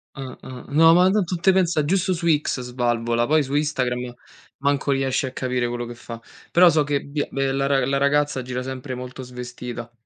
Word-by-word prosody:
Ah-ah 130 -1 -9
no, 165 +3 +6
ma 180 +2 +5
tanto 190 -3 0
te 190 +3 +4
pensa 175 -4 +2
giusto 185 +4 +1
su 170 -1 -3
X 150 -4 +1
svalvola, 120 -1 0
poi 155 +4 +3
su 140 0 -3
Instagram 125 -5 -1 0.4
manco 140 0 0
riesci 135 0 0
a 130 - -5
capire 125 -2 -1
quello 120 0 -4
che 120 - -8
fa. 115 0 -9 0.3
Però 175 +1 +7
so 155 -2 +3
che 145 -1 -1
Bia 145 +1 -3
ehm, 135 0 0
la 135 - +1
ra 140 -1 +2
la 135 +1 0
ragazza 140 -1 +1
gira 125 0 -4
sempre 130 +1 -6
molto 125 +1 -7
svestita. 125 -1 -7
135 Hz, 195 wpm, -23 LUFS, 125-150 Hz, 0.4 s, Però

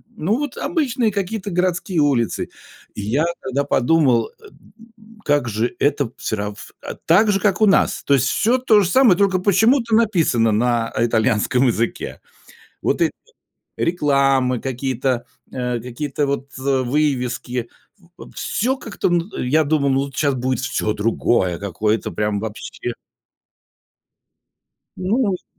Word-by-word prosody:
ну 205 +8 0
вот 290 0 -4
обычные 260 - 0
какие-то 200 +1 -3
городские 180 0 0
улицы. 125 -9 +1 0.5
И - - -5
я 125 +10 0 0.2
тогда 140 +2 -1
подумал, 130 -4 +2
э, - - -16 0.5
м, 220 0 -19
как 145 -5 +1
же 110 - -2
это 140 -4 +1
всё 110 - -3
рав 105 0 -6
а, - - -6
так 210 +6 +3
же, 195 - 0
как 195 -2 +1
у - - +7
нас. 195 - +2
То 140 - +3
есть 135 -1 +3
всё 235 +4 +2
то 235 -5 +4
же 185 - 0
самое, 235 -6 +5
только 195 -2 +2
почему-то 225 +5 +3
написано 165 - +2
на 115 0 0
итальянском 115 +2 +2
языке. 115 0 -2 0.6
Вот - - 0
эти - - +3 0.7
рекламы, 135 -6 +1
какие-то, 130 -1 -2 0.3
а, 125 -2 -2
какие-то 135 +4 -3
вот, 140 0 -3
э, 135 0 0
вывески, 125 -3 -1 0.5
в - - -12
всё 260 +5 -1
как-то, 225 -6 -2
м, 175 +1 0
я 150 +6 +2
думал, 140 -2 +1
ну 135 - +2
вот 140 -2 -10
щас 140 -1 +1
будет 130 -1 -1
всё 110 -4 -1
другое 105 -4 0
какое-то 105 +2 -1
прям 105 -1 -1
вообще. 110 +2 -6 2.0
Ну, 190 +7 0
может 200 -8 -1
140 Hz, 145 wpm, -20 LUFS, 120-190 Hz, 2.0 s, у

